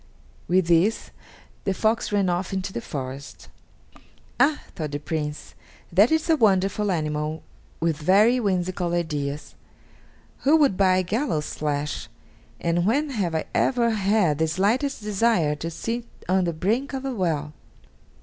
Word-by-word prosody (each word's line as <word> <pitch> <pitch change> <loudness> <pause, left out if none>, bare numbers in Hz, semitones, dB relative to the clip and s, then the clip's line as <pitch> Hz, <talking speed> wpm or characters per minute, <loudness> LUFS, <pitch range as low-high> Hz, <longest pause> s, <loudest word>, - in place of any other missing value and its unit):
With 185 0 +3
this 175 +6 +2 0.5
the 195 - -1
fox 220 +3 0
ran 200 -2 +2
off 180 +2 -1
into 190 0 -3
the - - -3
forest! 135 +1 -7 0.9
"Ah!" 295 +1 +3
thought 155 -3 -3
the 145 - -3
young 145 - -16
Prince, 150 -2 -4 0.4
"that 205 - +5
is 320 0 +1
a 325 - +4
wonderful 205 -3 +2
animal 155 -1 -2 0.4
with 165 -2 0
very 205 +10 +4
whimsical 180 -4 -1
ideas! 150 -4 -3 0.9
Who 295 +4 +4
would 285 -10 +3
buy 185 -1 +3
gallows' 185 - -1
flesh, 150 -1 -3 0.5
and 170 +1 0
when 285 +6 +1
have 190 -9 -1
I 160 - -1
ever 240 -3 +2
had 200 -7 +2
the 160 - +2
slightest 220 - 0
desire 210 -7 +2
to 165 - -4
sit 230 +8 -4 0.2
on 185 0 +2
the 170 - -1
brink 225 - -1
of 270 0 -4
a 265 - -2
well?" 155 -8 -1
185 Hz, 150 wpm, -24 LUFS, 160-220 Hz, 0.9 s, that